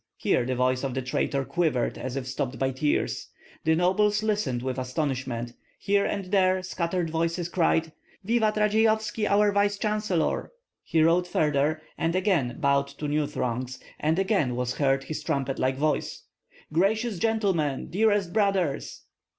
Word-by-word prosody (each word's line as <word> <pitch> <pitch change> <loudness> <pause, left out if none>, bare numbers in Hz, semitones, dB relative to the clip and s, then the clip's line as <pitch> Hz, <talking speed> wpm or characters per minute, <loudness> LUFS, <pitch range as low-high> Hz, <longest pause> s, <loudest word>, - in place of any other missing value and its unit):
Here 120 - +1
the 130 - -1
voice 125 +1 +1
of 135 -2 -2
the 130 - -2
traitor 135 +2 -1
quivered 155 -8 0
as 130 0 -5
if 135 -2 -3
stopped 130 0 -3
by 135 0 0
tears. 145 +3 -1 0.4
The 160 0 +4
nobles 210 +5 +2
listened 205 - -1
with 130 0 -2
astonishment; 130 -3 -3 0.2
here 200 0 +1
and 200 -2 -2
there 185 -2 +3
scattered 175 -2 -2
voices 165 +1 -1
cried, 165 -2 +1 0.3
"Vivat 220 0 +2
Radzeyovski, 220 0 +2
our 205 +1 +4
vice 205 0 +2
chancellor!" 210 - -1 0.3
He 160 -1 +1
rode 175 +2 +3
farther, 150 -1 +1 0.2
and 165 +1 0
again 175 - +1
bowed 140 -2 +2
to 140 +2 -6
new 150 0 0
throngs, 125 -3 -3 0.2
and 155 +2 +1
again 190 - +1
was 125 0 -2
heard 135 -1 +2
his 155 - -5
trumpet 140 -4 -2
like 130 +1 +1
voice: 150 +2 -1 0.5
"Gracious 205 +4 +1
gentlemen, 190 -11 0
dearest 205 -2 +2
brothers!" 195 -8 0
160 Hz, 150 wpm, -26 LUFS, 135-200 Hz, 0.5 s, The